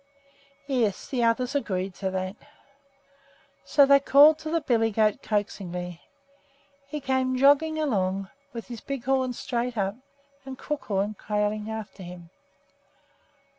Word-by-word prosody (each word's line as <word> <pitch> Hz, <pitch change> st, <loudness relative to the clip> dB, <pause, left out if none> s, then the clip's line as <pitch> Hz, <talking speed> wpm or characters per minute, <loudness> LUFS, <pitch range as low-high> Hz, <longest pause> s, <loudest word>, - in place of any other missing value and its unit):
Yes, 240 Hz, -8 st, 0 dB
the 250 Hz, -3 st, 0 dB
others 245 Hz, +3 st, +1 dB
agreed 190 Hz, -9 st, -2 dB
to 190 Hz, -, -1 dB
that. 185 Hz, +1 st, -3 dB, 1.3 s
So 285 Hz, -, +5 dB
they 280 Hz, 0 st, +6 dB
called 290 Hz, +3 st, +6 dB
to 315 Hz, 0 st, -6 dB
the 335 Hz, +1 st, +1 dB
billy 230 Hz, -6 st, +2 dB
goat 215 Hz, -1 st, +1 dB
coaxingly. 180 Hz, -4 st, -3 dB, 0.9 s
He 300 Hz, +1 st, -4 dB
came 260 Hz, -1 st, 0 dB
jogging 290 Hz, +4 st, +4 dB
along 195 Hz, -9 st, -1 dB, 0.2 s
with 230 Hz, -2 st, -7 dB
his 235 Hz, -3 st, -8 dB
big 275 Hz, -3 st, -5 dB
horns 260 Hz, -1 st, 0 dB
straight 240 Hz, 0 st, -2 dB
up 195 Hz, -1 st, 0 dB, 0.5 s
and 265 Hz, -1 st, -8 dB
Crookhorn 210 Hz, -9 st, -2 dB
trailing 210 Hz, 0 st, -1 dB
after 220 Hz, -2 st, -7 dB
him. 175 Hz, -1 st, -10 dB
230 Hz, 130 wpm, -26 LUFS, 195-270 Hz, 1.3 s, they